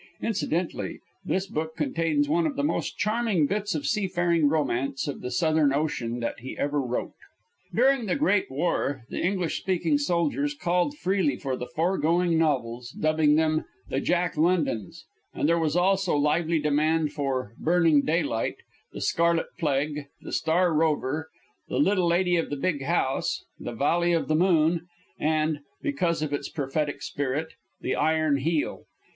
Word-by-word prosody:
Incidentally 180 -6 -2 0.2
this 190 0 -1
book 160 -3 -4
contains 165 - +1
one 325 +2 +2
of 290 - -4
the 285 - -1
most 295 - -1
charming 210 -5 +1
bits 205 +3 -1
of 150 - -3
seafaring 175 -7 +2
romance 140 -3 -1
of 145 - -4
the 125 - -4
Southern 155 +2 +2
Ocean 125 -5 -1
that 115 - -3
he 130 +3 -8
ever 145 0 0
wrote. 125 -2 -3 0.6
During 260 -1 +3
the - - +1
Great 280 -10 +2
War, 140 -2 -1
the - - -3
English 180 -3 0
speaking 170 -6 +1
soldiers 265 - 0
called 180 +6 0
freely 185 - +1
for 130 -1 -3
the 125 - -6
foregoing 170 +3 +1
novels, 125 -6 0
dubbing 155 -1 +3
them 155 0 +1 0.2
"The - - -1
Jacklondons"; 165 - 0 0.3
and - - +1
there 170 +1 +3
was 155 -1 0
also 190 0 +2
lively 155 +3 +2
demand 150 +1 +1
for 130 -6 -2
"Burning 165 -3 +4
Daylight," 155 -7 0 0.4
"The - - -7
Scarlet 170 0 +1
Plague," 145 -1 -1
"The - - -9
Star 170 +2 +2
Rover," 155 0 0 0.4
"The - - -2
Little 195 -10 +3
Lady 175 +1 +2
of 165 - -1
the 145 - -3
Big 145 0 -1
House," 135 -3 0
"The 120 - -5
Valley 170 +7 +2
of 165 - 0
the 155 - +3
Moon," 170 -1 +3 0.3
and, 155 0 +1 0.2
because 180 - 0
of 150 -1 -3
its 145 - -3
prophetic 145 +1 -2
spirit, 145 +3 -2 0.3
"The - - -1
Iron 155 -2 +2
Heel." 155 +3 -1
160 Hz, 155 wpm, -26 LUFS, 145-180 Hz, 0.6 s, Burning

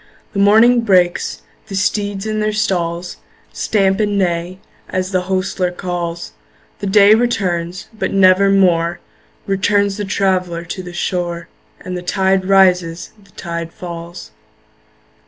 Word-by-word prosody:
The 200 - -2
morning 225 +4 +5
breaks; 180 -5 +1 0.2
the 195 - -6
steeds 205 0 -1
in 215 0 -2
their 215 0 0
stalls 175 -4 -2 0.4
Stamp 195 -2 +1
and 205 -1 0
neigh, 175 -1 -1 0.3
as 185 +1 -2
the 185 -1 -1
hostler 185 -1 -1
calls; 175 -2 -5 0.5
The 200 - -4
day 200 +1 +6
returns, 185 -7 -1
but 220 - -3
nevermore 185 -3 +3 0.5
Returns 200 +1 +1
the 205 - -3
traveller 185 -3 -1
to 185 - -6
the 180 -1 -9
shore, 175 -1 -3 0.3
And 185 - -6
the 180 - -4
tide 190 +1 +1
rises, 180 -3 +2
the 195 - -23
tide 170 -1 -6
falls. 170 0 -9
185 Hz, 130 wpm, -17 LUFS, 175-200 Hz, 0.5 s, day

